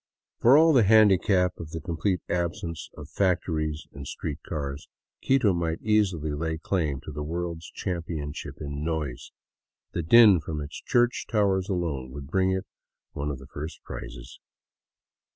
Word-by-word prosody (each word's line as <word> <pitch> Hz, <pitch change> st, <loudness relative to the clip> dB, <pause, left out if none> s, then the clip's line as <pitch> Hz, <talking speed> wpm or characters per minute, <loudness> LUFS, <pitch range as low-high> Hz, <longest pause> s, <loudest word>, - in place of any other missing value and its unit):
For 125 Hz, +5 st, +7 dB
all 160 Hz, +1 st, +6 dB
the 130 Hz, -, +6 dB
handicap 100 Hz, -3 st, +4 dB
of 80 Hz, -, -7 dB
the 80 Hz, -, -5 dB
complete 85 Hz, +3 st, -1 dB
absence 85 Hz, -2 st, -3 dB
of 75 Hz, -, -8 dB
factories 80 Hz, -4 st, 0 dB
and 70 Hz, 0 st, -8 dB
street 75 Hz, 0 st, -5 dB
cars, 70 Hz, -3 st, -5 dB, 0.4 s
Quito 130 Hz, -7 st, +3 dB
might 85 Hz, -2 st, -1 dB
easily 95 Hz, -8 st, +1 dB
lay 80 Hz, +2 st, -2 dB
claim 80 Hz, -5 st, -1 dB
to 80 Hz, -, -8 dB
the 75 Hz, +1 st, -5 dB
world's 85 Hz, +1 st, -4 dB
championship 85 Hz, -5 st, -4 dB
in 70 Hz, -1 st, -5 dB
noise. 75 Hz, -6 st, -3 dB, 0.6 s
The -, -, -2 dB
din 105 Hz, +2 st, +7 dB
from 80 Hz, 0 st, -5 dB
its 75 Hz, +1 st, -7 dB
church 120 Hz, -1 st, +1 dB
towers 100 Hz, -3 st, +1 dB
alone 80 Hz, -9 st, -2 dB
would 70 Hz, +1 st, -9 dB
bring 95 Hz, -1 st, +2 dB
it 95 Hz, 0 st, -1 dB, 0.5 s
one 70 Hz, +1 st, -3 dB
of 70 Hz, -, -3 dB
the 65 Hz, -, -12 dB
first 75 Hz, +4 st, -8 dB
prizes. -, -, -9 dB
85 Hz, 150 wpm, -27 LUFS, 75-95 Hz, 0.6 s, For